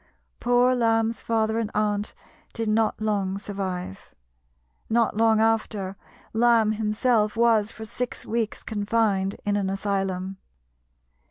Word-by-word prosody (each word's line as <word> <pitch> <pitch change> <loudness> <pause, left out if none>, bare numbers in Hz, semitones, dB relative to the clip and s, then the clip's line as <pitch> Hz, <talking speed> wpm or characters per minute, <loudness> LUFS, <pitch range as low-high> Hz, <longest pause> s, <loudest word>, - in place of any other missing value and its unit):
Poor 245 +1 +3
Lamb's 225 -2 +1
father 225 0 0
and 225 -2 -2
aunt 210 0 0 0.4
did 225 -1 -3
not 215 +1 +1
long 200 -3 -1
survive. 190 - -5 0.7
Not 230 -1 +2
long 220 0 +4
after, 215 -3 0 0.4
Lamb 225 -1 +4
himself 215 +1 +1
was 225 -2 +3
for 220 - -8
six 245 +3 -4
weeks 225 -1 -2
confined 205 -2 0
in 205 0 +1
an 200 -2 0
asylum. 195 -1 -2
215 Hz, 115 wpm, -25 LUFS, 200-225 Hz, 0.7 s, long